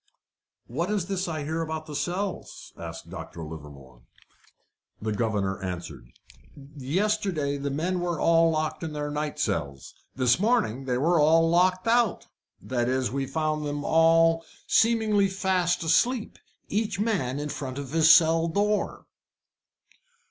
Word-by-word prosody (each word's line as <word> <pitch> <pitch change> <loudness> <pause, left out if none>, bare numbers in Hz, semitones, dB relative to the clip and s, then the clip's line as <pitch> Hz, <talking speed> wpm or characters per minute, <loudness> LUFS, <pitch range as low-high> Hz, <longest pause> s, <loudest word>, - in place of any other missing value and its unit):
"What 165 - -3
is 205 -4 0
this 190 0 -2
I 155 -3 -3
hear 160 +3 -2
about 160 -1 -4
the 150 - -9
cells?" 185 +5 -4
asked - - -9
Dr. 85 -2 -8
Livermore. 70 -5 -11 1.0
The 110 0 -3
governor 105 -3 -1
answered: 90 -9 -6 0.7
"Yesterday 165 0 -1
the 140 0 -3
men 170 +6 -1
were 175 -2 -2
all 165 0 +4
locked 155 -1 -2
in 160 -2 -5
their 145 0 -3
night 150 0 -3
cells. 70 - -3 0.2
This 125 +2 +2
morning 205 - +1
they 125 -2 0
were 165 +5 +2
all 165 +2 +5
locked 185 +3 +2
out 235 -4 +2 0.3
that 120 -1 -2
is, 130 -3 0
we 135 0 -2
found 155 0 -1
them 145 0 -4
all 165 0 +4 0.2
seemingly 220 -3 +3
fast 190 -3 0
asleep, 235 +8 +1 0.3
each 210 -1 -2
man 185 - 0
in 145 +1 -4
front 130 -2 -5
of 140 -2 -6
his 160 0 +5
cell 165 0 +5
door." 205 +4 -1
160 Hz, 140 wpm, -26 LUFS, 135-185 Hz, 1.0 s, all